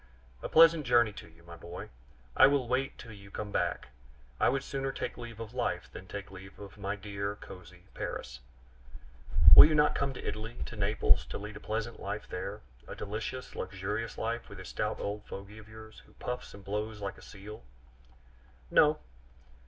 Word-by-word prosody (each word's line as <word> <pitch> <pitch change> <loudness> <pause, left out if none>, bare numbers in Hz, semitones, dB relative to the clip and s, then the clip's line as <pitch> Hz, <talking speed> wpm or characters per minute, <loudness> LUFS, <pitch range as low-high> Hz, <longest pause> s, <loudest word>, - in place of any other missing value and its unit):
A - - -4
pleasant 165 -1 +7
journey 120 -4 +4
to - - -10
you, 80 +1 -20
my 85 0 -11
boy! 85 +2 -8 0.5
I - - +9
will 140 -3 +2
wait 130 +2 0
till 115 - -10
you 100 -2 -12
come 105 +1 -5
back. - - -1 0.5
I - - +5
would 135 +1 0
sooner 135 -1 -2
take - - -4
leave 115 -2 -9
of 115 0 -7
life 120 -8 -2
than 95 - -10
take 100 0 -7
leave 95 +1 -11
of 100 0 -11
my 100 +1 -2
dear, 100 0 -4
cozy 90 -3 -12
Paris - - -5 0.5
" 60 +3 +4
"Will - - +14
you 155 - +1
not 150 0 +5
come 135 - 0
to - - -6
Italy, 110 +2 -4
to - - -8
Naples, 105 0 +3
and 100 - -5
lead 105 0 -7
a - - -9
pleasant 110 +2 -3
life 100 +2 -4
there 100 +3 -5 0.3
a - - -7
delicious, 110 +5 -5
luxurious 105 +4 -3
life, 115 +1 -3
with 100 - -10
this 95 -1 -8
stout 105 0 -2
old 105 +1 -3
fogey 100 +2 -8
of 110 0 -14
yours, 110 0 -12
who - - -21
puffs 125 -3 -5
and 100 -1 -13
blows 105 +2 -3
like 100 -1 -5
a - - -15
seal?" 105 -1 -10 1.1
"No." 150 0 +5
105 Hz, 190 wpm, -31 LUFS, 100-115 Hz, 1.1 s, Will